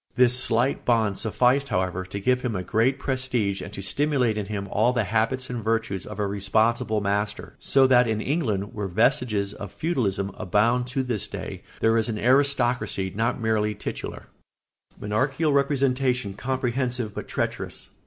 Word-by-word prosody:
This 125 0 +4
slight 125 +1 +1
bond 110 -5 +1
sufficed, 125 +5 +2
however, 95 -2 -1
to 100 +2 -5
give 125 +5 +1
him 120 -4 -2
a 90 - -2
great 115 +8 +1
prestige 125 -8 -1
and 90 +1 -7
to 100 - -6
stimulate 135 -2 +1
in 105 -2 -3
him 100 -2 -4
all 115 +4 +3
the 120 -3 +1
habits 115 +6 0
and 120 -3 -5
virtues 115 -4 -1
of 105 - -7
a 105 - 0
responsible 105 +2 +1
master; 100 +1 -2
so 135 -1 +4
that 125 -2 +5
in 110 -1 0
England, 110 - -1
where 105 -2 -3
vestiges 105 +1 +1
of 100 -3 -8
feudalism 100 - -1
abound 115 +5 +1
to 130 +1 -1
this 120 -6 -2
day, - - -6 0.2
there 115 0 +4
is 110 - -1
an 110 - -2
aristocracy 120 -6 +2
not 115 +4 0
merely 110 -2 0
titular. 105 - -6 0.7
[Sidenote: - - -21
Monarchical 135 +8 0
representation 135 -5 +1
comprehensive 125 0 -2
but - - -6
treacherous. - - -4
115 Hz, 165 wpm, -25 LUFS, 105-125 Hz, 0.7 s, that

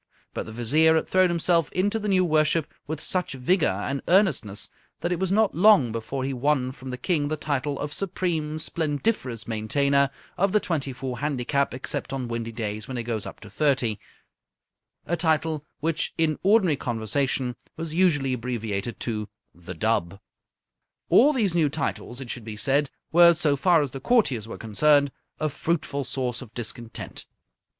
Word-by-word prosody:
But - - -4
the - - -7
Vizier 150 +8 +3
had 160 - +1
thrown 185 -1 +4
himself 170 -2 +2
into 205 +4 0
the 210 - -4
new 185 -2 +3
worship 155 -1 +2
with 155 0 -3
such 180 -2 -2
vigour 130 - +1
and 140 0 -2
earnestness 170 - +2 0.3
that 175 - -1
it 175 - 0
was 190 -1 0
not 215 +1 +3
long 185 - +5
before 115 +4 -4
he 135 +1 -2
won 130 0 +1
from 130 -1 -10
the 125 - -4
King 145 +1 0
the 155 +1 -2
title 145 -1 -2
of 145 0 -4
Supreme 165 -4 -2
Splendiferous 145 - -2
Maintainer 140 +5 +2 0.3
of 195 +1 +2
the 210 - +5
Twenty 150 -8 -2
Four 125 -1 -5
Handicap 140 -1 0
Except 130 +1 -3
on 130 -2 -3
Windy 115 -1 -4
Days 110 -2 -4
when 130 - -5
It 120 - -2
Goes 115 -2 -3
Up - - -9
to 105 - -11
Thirty 130 -6 +1 1.1
a 175 - 0
title 160 -2 0
which 160 0 -1
in 160 -2 +1
ordinary 190 -6 +4
conversation 125 +2 -1 0.2
was 165 -1 -5
usually 150 -7 +2
abbreviated 115 -3 -3
to 105 -3 -3 0.2
The 90 +1 -9
Dub. 95 -1 0 0.9
All 285 +5 +6
these 220 - +1
new 165 -4 +3
titles, 135 -4 -3
it 130 -3 -6
should 120 - -6
be 110 -1 -7
said, 140 +4 +1 0.2
were, 170 0 +7
so 150 -2 +2
far 165 +2 +4
as 140 - -4
the 135 - -6
courtiers 135 - +2
were - - -7
concerned, 140 +6 +3 0.3
a 155 - +1
fruitful 155 -1 -2
source 125 -1 -2
of 120 -4 -10
discontent. 115 -1 -6
140 Hz, 175 wpm, -25 LUFS, 120-165 Hz, 1.1 s, were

